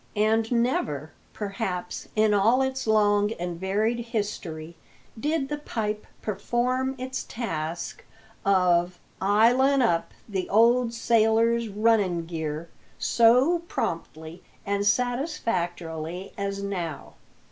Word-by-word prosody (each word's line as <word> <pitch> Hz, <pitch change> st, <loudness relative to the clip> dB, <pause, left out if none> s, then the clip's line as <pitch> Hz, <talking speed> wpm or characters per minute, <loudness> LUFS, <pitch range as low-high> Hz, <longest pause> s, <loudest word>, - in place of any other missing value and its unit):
And 220 Hz, +2 st, +2 dB
never, 160 Hz, -, 0 dB, 0.2 s
perhaps, 195 Hz, -4 st, -4 dB
in 215 Hz, -1 st, +4 dB
all 225 Hz, +6 st, +4 dB
its 265 Hz, -2 st, -2 dB
long 205 Hz, -1 st, +3 dB
and 175 Hz, -3 st, -5 dB
varied 210 Hz, +5 st, 0 dB
history, 205 Hz, -8 st, -4 dB, 0.4 s
did 295 Hz, +1 st, 0 dB
the 295 Hz, +1 st, -4 dB
pipe 215 Hz, -6 st, -3 dB, 0.2 s
perform 250 Hz, +5 st, -1 dB
its 260 Hz, +1 st, -4 dB
task 170 Hz, -, -4 dB, 0.4 s
of 180 Hz, -2 st, +3 dB, 0.2 s
"'ilin' 245 Hz, +7 st, +4 dB
up" 170 Hz, -8 st, +1 dB, 0.2 s
the 195 Hz, -4 st, -3 dB
old 235 Hz, +3 st, +4 dB
sailors 230 Hz, 0 st, +2 dB
"runnin' 205 Hz, -5 st, +2 dB
gear" 160 Hz, -1 st, -4 dB, 0.3 s
so 250 Hz, +9 st, +4 dB
promptly 160 Hz, -, -4 dB, 0.2 s
and 200 Hz, 0 st, 0 dB
satisfactorily 185 Hz, -, -2 dB
as 200 Hz, 0 st, -3 dB
now. 175 Hz, -6 st, -4 dB
210 Hz, 105 wpm, -26 LUFS, 180-235 Hz, 0.4 s, in